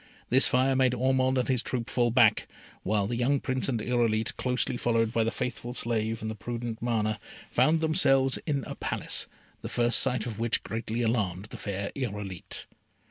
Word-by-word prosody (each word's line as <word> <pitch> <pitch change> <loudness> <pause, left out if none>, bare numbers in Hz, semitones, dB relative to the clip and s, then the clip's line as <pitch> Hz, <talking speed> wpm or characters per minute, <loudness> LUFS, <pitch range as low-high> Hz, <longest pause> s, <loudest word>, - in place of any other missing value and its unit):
This 130 +2 +6
fire 130 +1 +2
made 130 -1 +3
Ormond 130 +1 +2
and 125 - +1
his 130 -3 +2
troop 120 -2 -3
fall 120 -2 +2
back, 120 -2 +4 0.3
while 105 0 +1
the 120 +4 -2
young 135 +3 +2
Prince 130 0 -1
and 120 -4 0
Irolite, 115 -1 0
closely 125 -1 -1
followed 115 -2 +1
by 115 - +2
the 110 - +1
faithful 120 0 -4
slave 110 -2 -1
and 110 - -2
the - - -4
prudent 115 +1 -5
Mana, 110 -2 0 0.3
found 160 +1 +3
themselves 135 -5 +3
in 140 -3 0
a - - -5
Palace, - - -2 0.3
the - - -5
first 120 0 +2
sight 125 -4 0
of 115 -3 -5
which 115 0 0
greatly 115 +1 -3
alarmed 105 -5 0
the - - -7
fair 100 0 -4
Irolite. 105 -8 -5
120 Hz, 185 wpm, -28 LUFS, 110-130 Hz, 0.3 s, This